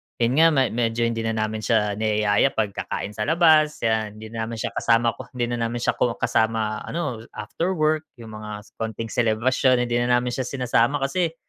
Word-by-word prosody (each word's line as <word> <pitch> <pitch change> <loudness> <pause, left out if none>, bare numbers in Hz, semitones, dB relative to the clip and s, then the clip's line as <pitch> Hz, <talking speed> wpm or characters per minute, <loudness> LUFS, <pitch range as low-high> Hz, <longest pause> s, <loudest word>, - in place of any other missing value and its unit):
yun 120 +5 +1
nga, 165 - +7
me 130 -2 +2
medyo 115 0 0
hindi 115 -1 0
na 115 0 -1
namin 110 0 -2
siya 105 -2 0
niyaya 105 +3 +2
pag-kakain 105 -1 -3
sa 105 0 -4
labas 155 -2 +4
kaya 110 -1 +1
hindi 110 +1 -11
naman 115 0 -4
siya 110 - -3
kasama 115 0 +2
ko 130 - -8
hindi 120 -1 -1
na 120 -1 -1
namin 120 +1 -4
siya - - 0 0.2
kasama 110 -1 0
ano 125 -9 -4
after 185 +3 -3
work, 155 -1 +1
yung 115 -3 -11
mga 105 -1 -7 0.2
konting 110 0 -4
selebrasyon 125 +2 +2
hindi 120 0 0
na 120 0 +2
namin 120 0 0
siya 130 +1 -3
sinasama 125 0 +1
kasi, 165 +3 -1
115 Hz, 190 wpm, -23 LUFS, 110-130 Hz, 0.2 s, nga